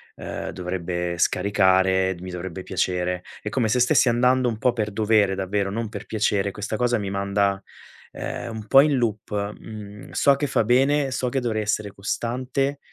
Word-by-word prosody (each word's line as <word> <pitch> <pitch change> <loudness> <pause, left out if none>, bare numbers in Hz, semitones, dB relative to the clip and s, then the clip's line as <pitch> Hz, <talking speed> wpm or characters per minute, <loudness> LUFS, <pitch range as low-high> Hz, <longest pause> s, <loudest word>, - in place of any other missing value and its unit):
uhm, - - -6
dovrebbe 90 -1 -3
scaricare, 95 0 +3
mi 90 0 -7
dovrebbe 90 +1 -6
piacere. 90 0 -1 0.2
È 105 - -4
come 115 +1 0
se 125 +3 +1
stessi 125 - +4
andando 125 +1 +3
un 115 - -1
po' 125 +3 +2
per 110 -3 -2
dovere 105 -2 +2
davvero, 95 +1 -1
non 115 +1 -3
per - - -7
piacere. 100 -2 0
Questa 105 +2 -4
cosa 120 0 +2
mi 100 -2 -3
manda, 100 0 0 0.5
ehm, 120 -2 -5
un 110 -1 -7
po' 135 - +7
in 145 0 +2
loop. 110 -4 -2 0.3
Mhmm, 105 -2 -10
so 140 -1 +4
che 145 +1 -2
fa 130 - +2
bene, 135 +4 +3
so 130 0 -1
che 135 +1 -1
dovrei 110 -3 -1
essere 105 -1 -1
costante, 130 +7 -2
105 Hz, 175 wpm, -24 LUFS, 95-120 Hz, 0.5 s, po